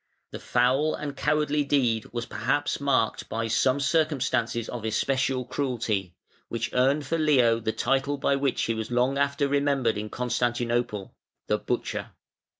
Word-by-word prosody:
The - - -6
foul 130 +5 +2
and 145 -2 -5
cowardly 150 0 +1
deed 125 -6 +1
was 120 0 -3
perhaps 125 +7 -1
marked 130 -6 +1
by 115 0 -2
some 130 +5 +2
circumstances 135 -7 0
of 120 -3 -6
especial 130 +3 0
cruelty, 115 -9 -2 0.3
which 115 0 -3
earned 135 +4 +2
for 165 +4 -1
Leo 125 -7 +4
the 110 -1 -1
title 135 +4 0
by 140 0 +1
which 140 -1 0
he 115 - 0
was 110 -1 -4
long 125 +3 +1
after 140 0 +1
remembered 140 -6 +1
in 105 0 -5
Constantinople, 120 -3 -1 0.3
"The - - 0
Butcher". - - -3
125 Hz, 150 wpm, -26 LUFS, 115-140 Hz, 0.3 s, Leo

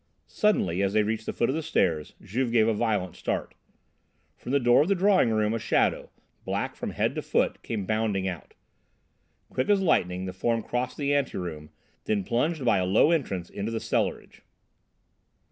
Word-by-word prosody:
Suddenly, 95 - +1
as 100 0 0
they 110 0 +3
reached 110 +1 -3
the - - 0
foot 120 - 0
of - - +1
the 160 - -1
stairs, 85 - 0
Juve 120 +4 -2
gave 115 -2 +4
a 115 - +2
violent 105 -5 -1
start. - - -3 0.8
From 125 - -8
the 140 - +3
door 120 0 +5
of 150 - +1
the 200 - +2
drawing 190 - +4
room 110 -1 +1
a 115 - -1
shadow, - - +1 0.3
black - - -3
from - - -5
head - - -1
to - - -3
foot, - - 0
came 105 -4 -4
bounding 110 -2 0
out. 90 -4 -7 1.0
Quick 130 - -1
as 205 -1 +5
lightning 90 - +1
the 95 - -5
form 115 +4 -1
crossed 125 +1 -3
the 145 -1 0
ante 140 -2 0
room, 80 -4 -6 0.4
then 105 -2 0
plunged 140 - -1
by 100 -5 +4
a 90 - 0
low 110 - +4
entrance 100 - -1
into 100 +2 -4
the 115 - -2
cellarage. - - -2
110 Hz, 190 wpm, -27 LUFS, 95-130 Hz, 1.0 s, door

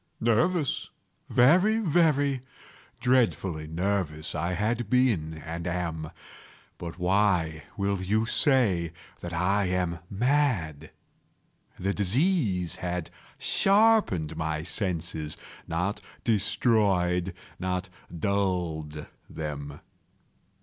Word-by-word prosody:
—nervous—very, 160 - +2
very 150 - +2 0.6
dreadfully 100 -11 +1
nervous 85 -2 -2
I 85 +4 -1
had 110 +4 -1
been 110 -12 +2
and 85 +2 -6
am; 85 -3 -3 0.7
but 85 0 -6
why 90 -4 +1
will 100 -1 0
you 105 +4 +1
say 105 - +2 0.3
that 85 - -6
I 95 +4 +1
am 90 -2 -1
mad? 100 - 0 0.9
The 100 +2 -1
disease 105 - +1
had 90 -2 -3 0.3
sharpened 200 - +3
my 80 -1 -2
senses—not 85 +1 -3 0.2
destroyed—not 95 -4 0 0.3
dulled 85 -5 -1 0.2
them. 75 -2 -6
95 Hz, 80 wpm, -27 LUFS, 85-115 Hz, 0.9 s, sharpened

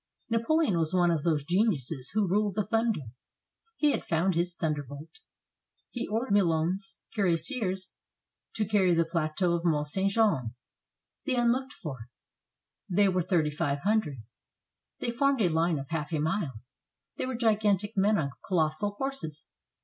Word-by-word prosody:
Napoleon 230 - +2
was 160 +2 0
one 175 -1 +4
of 160 -3 0
those 155 -3 +1
geniuses 160 - 0
who 210 -2 +2
rule 205 +3 +2
the 205 +1 -1
thunder. 225 -4 +1 0.8
He 300 -1 +3
had - - -2
found 170 +4 +1
his 175 +1 -1
thunderbolt. 150 - -4 0.7
He 240 - -4
ordered 225 +1 -1
Milhaud's 185 0 +1 0.2
cuirassiers 190 - 0 0.6
to 215 - 0
carry 190 -4 +3
the 165 0 +3
plateau 165 +2 0
of 170 -1 -1
Mont 150 -4 +2
St. 190 +6 0
Jean. 195 - +1 0.7
THE 265 - +1
UNLOOKED 250 +3 +1
FOR 130 - -8 0.8
They 195 +2 +4
were 185 -1 +1
3500. 150 - 0 0.7
They 235 - -2
formed 275 +2 +2
a 180 - +4
line 165 0 +1
of 135 -1 -6
half 155 -2 -3
a 160 - 0
mile. 160 -2 -1 0.6
They - - -2
were 260 - -3
gigantic 210 -3 +1
men 205 +2 +3
on 140 -4 -1 0.2
colossal 180 +3 0
horses. 270 - -5
185 Hz, 145 wpm, -29 LUFS, 160-215 Hz, 0.8 s, one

